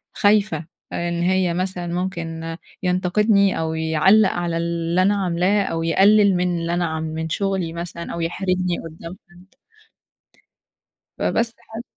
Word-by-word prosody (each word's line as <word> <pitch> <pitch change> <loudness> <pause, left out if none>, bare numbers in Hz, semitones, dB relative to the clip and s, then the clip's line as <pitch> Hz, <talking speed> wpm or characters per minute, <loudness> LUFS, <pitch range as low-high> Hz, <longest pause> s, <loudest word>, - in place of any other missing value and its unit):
خايفة 205 -6 +2 0.3
آآ، 175 0 -2
إن 170 0 -2
هي 185 -1 +2
مثلًا 180 -1 -2
ممكن 165 -3 -4 0.3
ينتقدني، 195 +2 +2
أو 160 0 -1
يعلَّق 160 +6 +4
على 175 -1 -2
اللي 170 +1 0
أنا 200 +2 +3
عاملاه، 185 +4 +1
أو 165 -3 -2
يقلِّل 200 +3 +4
من 180 -1 0
اللي 170 +1 -2
أنا 175 0 0
ع 160 -1 -3
من 160 0 -4
شغلي 190 -2 -1
مثلًا 170 0 -6
أو 170 - -4
يحرجني 180 +1 -1
قدّام 165 +3 -9
حد. 185 +7 -20 1.6
فبس 230 0 0
حا 230 0 -9
175 Hz, 140 wpm, -21 LUFS, 165-190 Hz, 1.6 s, يعلَّق